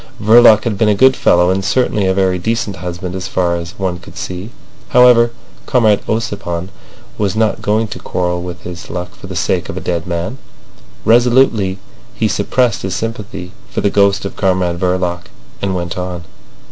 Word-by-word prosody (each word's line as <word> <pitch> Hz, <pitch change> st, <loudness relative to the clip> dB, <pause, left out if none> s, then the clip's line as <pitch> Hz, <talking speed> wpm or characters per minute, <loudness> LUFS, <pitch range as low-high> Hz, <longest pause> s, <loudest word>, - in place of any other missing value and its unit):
Verloc 110 Hz, 0 st, +6 dB
had 105 Hz, -5 st, -2 dB
been 110 Hz, -, +3 dB
a 105 Hz, -, +3 dB
good 130 Hz, +4 st, +5 dB
fellow, 90 Hz, +1 st, +3 dB
and 95 Hz, +1 st, -1 dB
certainly 105 Hz, -2 st, +1 dB
a 95 Hz, -, +2 dB
very 95 Hz, -2 st, +1 dB
decent 110 Hz, 0 st, -2 dB
husband 90 Hz, 0 st, -5 dB
as 95 Hz, -1 st, -4 dB
far 90 Hz, -2 st, 0 dB
as 85 Hz, +2 st, -7 dB
one 90 Hz, -3 st, -2 dB
could -, -, -14 dB
see. 90 Hz, +4 st, -5 dB, 0.4 s
However, 125 Hz, -1 st, +6 dB, 0.4 s
Comrade 110 Hz, -5 st, +3 dB
Ossipon 100 Hz, -6 st, -3 dB, 0.5 s
was 100 Hz, -1 st, 0 dB
not 110 Hz, -1 st, +1 dB
going 110 Hz, +2 st, +1 dB
to 90 Hz, -, -7 dB
quarrel 90 Hz, 0 st, -2 dB
with 90 Hz, -1 st, -7 dB
his 90 Hz, -1 st, -8 dB
luck 90 Hz, -1 st, -5 dB
for -, -, -12 dB
the -, -, -7 dB
sake -, -, -1 dB
of -, -, -5 dB
a -, -, -1 dB
dead 85 Hz, 0 st, -3 dB
man. 90 Hz, +9 st, -3 dB, 0.7 s
Resolutely 120 Hz, -5 st, +3 dB, 0.4 s
he -, -, +1 dB
suppressed 125 Hz, -4 st, 0 dB
his 95 Hz, -2 st, -3 dB
sympathy 110 Hz, -4 st, -5 dB, 0.2 s
for -, -, -3 dB
the 100 Hz, -, +1 dB
ghost 100 Hz, -1 st, +2 dB
of 100 Hz, -, -5 dB
Comrade 90 Hz, -3 st, 0 dB
Verloc, 90 Hz, -1 st, -1 dB, 0.4 s
and 95 Hz, -1 st, -1 dB
went 85 Hz, -1 st, -3 dB
on. 90 Hz, -1 st, -5 dB
95 Hz, 180 wpm, -16 LUFS, 90-110 Hz, 0.7 s, Verloc